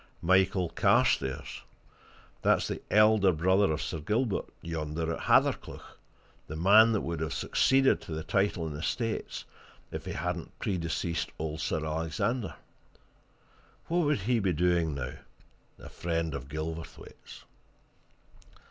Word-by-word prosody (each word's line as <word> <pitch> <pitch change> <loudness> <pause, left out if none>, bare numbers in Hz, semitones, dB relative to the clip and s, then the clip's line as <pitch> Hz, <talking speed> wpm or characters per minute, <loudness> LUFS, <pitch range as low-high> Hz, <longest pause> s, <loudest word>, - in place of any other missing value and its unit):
Michael 95 +1 +3
Carstairs 65 -2 +1 0.8
that's - - +3
the - - -4
elder 105 -2 +5
brother 95 +3 +2
of 80 +1 -2
Sir 80 - -4
Gilbert 105 - -1
yonder 80 0 -3
at - - -5
Hathercleugh, - - +1 0.5
the 75 - -6
man 105 +7 +6
that 110 - +1
would 85 -1 -4
have 80 0 -3
succeeded 135 0 +3
to - - -10
the 80 0 -3
title 100 -3 0
and 75 -2 -5
estates 110 +9 -3 0.5
if - - -6
he - - -4
hadn't - - -4
predeceased 85 -2 -2
old 80 0 -4
Sir 80 - -1
Alexander. 80 +9 -2 1.3
What 170 +2 +2
would 145 -8 +1
he 120 +4 +1
be 95 -4 +1
doing 85 -2 +1
now, 65 -3 -5 0.6
a - - -11
friend 80 -2 -2
of 70 -1 -6
Gilverthwaite's?" 80 +2 -7
85 Hz, 130 wpm, -29 LUFS, 80-100 Hz, 1.3 s, man